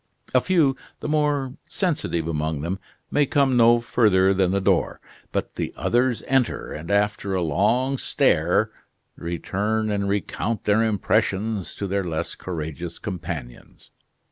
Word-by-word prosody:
A 130 - +5
few, 160 -7 +3 0.2
the - - -5
more 145 -3 +1 0.2
sensitive 150 - -1
among 80 -2 -1
them, 90 +5 -3 0.3
may 145 -1 +3
come 140 -2 +3
no 120 0 +6
further 100 -5 +3
than 95 -1 +2
the 100 +2 +1
door, 95 - +1 0.3
but - - -3
the - - -2
others 120 0 +1
enter, 135 -3 0
and 80 +2 -7
after 100 -1 +1
a 90 - +1
long 120 - +1
stare 90 +7 +2 0.4
return 105 +6 -2
and 100 -1 0
recount 100 +2 -2
their 105 +2 +3
impressions 105 -1 0
to 100 - -4
their 100 0 -1
less 80 -3 -3
courageous 85 -1 -5
companions. 85 -10 -7
100 Hz, 140 wpm, -24 LUFS, 85-120 Hz, 0.4 s, no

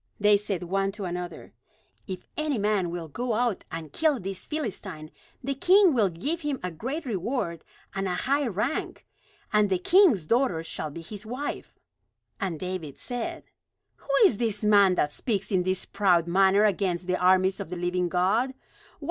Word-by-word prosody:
They 210 0 +5
said 200 -3 -2
one 195 +2 0
to 205 -2 -6
another: 180 0 -6 0.5
"If 185 -2 -6
any 305 -4 -1
man 205 -4 +1
will 170 -1 -5
go 240 - -3
out 235 -2 0
and 160 -3 -7
kill 310 -5 +2
this 190 -1 -6
Philistine, 195 - -5 0.3
the 275 +2 -1
king 365 +4 +5
will 215 -6 +3
give 285 - -3
him 290 -4 -2
a 180 - -2
great 265 - -4
reward 195 - -2 0.3
and 195 0 -2
a 180 - -1
high 280 +5 +1
rank; 225 - -2 0.5
and 210 -1 +4
the 190 - +2
king's 260 - +4
daughter 230 - +1
shall 155 -1 -4
be 165 +3 -8
his 205 +5 -8
wife." 250 +6 -5 0.6
And 185 -7 -2
David 180 -6 -5
said: 245 -2 -4 0.5
"Who - - -24 0.2
is 235 - +4
this 220 -3 -1
man 200 -3 +5
that 150 -3 0
speaks 205 -5 -2
in 185 -2 +3
this 185 +1 -1
proud 185 -5 +2
manner 195 +3 +4
against 185 -3 0
the 185 0 0
armies 185 +1 +3
of - - -5
the 180 - -5
living 180 0 0
God? 210 +9 +1
195 Hz, 175 wpm, -27 LUFS, 180-240 Hz, 0.6 s, They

